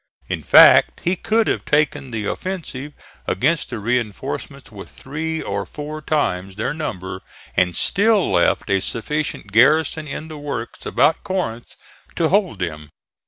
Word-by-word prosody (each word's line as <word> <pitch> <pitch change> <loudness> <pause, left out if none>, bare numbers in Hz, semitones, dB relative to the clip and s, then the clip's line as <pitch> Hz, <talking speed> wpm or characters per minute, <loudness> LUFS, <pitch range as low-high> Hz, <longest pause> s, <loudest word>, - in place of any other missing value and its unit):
In - - -2
fact - - +7
he 175 +2 +1
could 220 +4 +1
have - - -1
taken 150 -2 +1
the 110 -3 -4
offensive 150 - -5 0.3
against 155 - 0
the 120 - -4
reinforcements 110 -1 -3
with - - -10
three 160 +4 -5
or 100 0 -2
four 150 +8 -7
times 95 -12 -1
their 110 - -2
number 95 - -5 0.3
and 90 -2 +2
still 205 - +2
left 85 -2 +2
a 95 -1 +2
sufficient 115 0 -3
garrison 150 +7 +3
in 150 +2 -6
the 155 -2 -8
works 140 -5 -6
about 160 - +2
Corinth 180 - -4 0.4
to 160 -2 +1
hold 190 - +1
them. 75 -4 -5
145 Hz, 145 wpm, -21 LUFS, 100-160 Hz, 0.4 s, fact